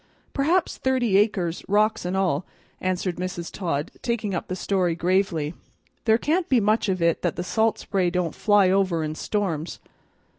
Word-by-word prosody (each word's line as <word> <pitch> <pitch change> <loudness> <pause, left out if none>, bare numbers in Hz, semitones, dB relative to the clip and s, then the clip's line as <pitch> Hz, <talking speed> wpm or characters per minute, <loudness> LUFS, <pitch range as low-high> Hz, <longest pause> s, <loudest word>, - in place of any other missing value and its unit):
"Perhaps 320 +6 +1
thirty 255 -6 +1
acres, 185 -5 0
rocks 210 0 +2
and 180 +2 -1
all," 185 -5 +1 0.4
answered 185 -1 -1
Mrs. 180 -1 -4
Todd, 165 -6 -2
taking 230 -5 -2
up 175 - -3
the 185 - -3
story 185 -3 0
gravely. 175 -3 0 0.5
"There 220 -1 +5
can't 330 +8 0
be 255 - +4
much 215 0 +2
of 185 -2 0
it 170 -1 +2
that - - -1
the 175 - -3
salt 220 +3 +1
spray 185 -3 0
don't 175 -1 -1
fly 205 -3 +4
over 185 -4 +1
in 155 0 -3
storms. 170 -3 -2
190 Hz, 170 wpm, -24 LUFS, 175-215 Hz, 0.5 s, There